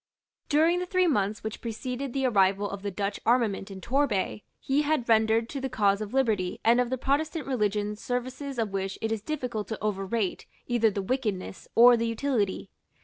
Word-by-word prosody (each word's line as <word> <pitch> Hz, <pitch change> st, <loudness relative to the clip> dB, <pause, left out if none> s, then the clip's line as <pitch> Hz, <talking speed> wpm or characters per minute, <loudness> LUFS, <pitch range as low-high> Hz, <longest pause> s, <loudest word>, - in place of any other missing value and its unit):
During 320 Hz, +4 st, +3 dB
the 360 Hz, -, -3 dB
three 370 Hz, 0 st, +2 dB
months 210 Hz, -, 0 dB
which 220 Hz, 0 st, -5 dB
preceded 250 Hz, +3 st, -4 dB
the 270 Hz, +1 st, -1 dB
arrival 200 Hz, -3 st, +3 dB
of 200 Hz, -1 st, -6 dB
the 205 Hz, -, -3 dB
Dutch 200 Hz, +1 st, -3 dB
armament 225 Hz, -5 st, +1 dB
in 190 Hz, -1 st, -9 dB
Torbay, 235 Hz, -6 st, 0 dB, 0.2 s
he 275 Hz, +2 st, +1 dB
had 300 Hz, -4 st, 0 dB
rendered 225 Hz, 0 st, +3 dB
to 275 Hz, -, -5 dB
the 265 Hz, -, -2 dB
cause 205 Hz, -4 st, +2 dB
of 210 Hz, -1 st, -5 dB
liberty 220 Hz, -9 st, 0 dB
and 235 Hz, +2 st, +5 dB
of 245 Hz, -, -1 dB
the 260 Hz, -, -1 dB
Protestant 295 Hz, +3 st, -1 dB
religion 210 Hz, -5 st, 0 dB
services 255 Hz, +4 st, -4 dB
of 220 Hz, -3 st, -1 dB
which 195 Hz, 0 st, -2 dB
it 225 Hz, -, -2 dB
is 220 Hz, -2 st, -1 dB
difficult 250 Hz, -5 st, -3 dB
to 220 Hz, -, -5 dB
overrate 200 Hz, 0 st, -2 dB, 0.2 s
either 235 Hz, -2 st, +2 dB
the 200 Hz, -1 st, -3 dB
wickedness 205 Hz, -6 st, -3 dB
or 240 Hz, +1 st, +8 dB
the 230 Hz, 0 st, -1 dB
utility. 230 Hz, -4 st, -1 dB
230 Hz, 190 wpm, -27 LUFS, 205-260 Hz, 0.2 s, or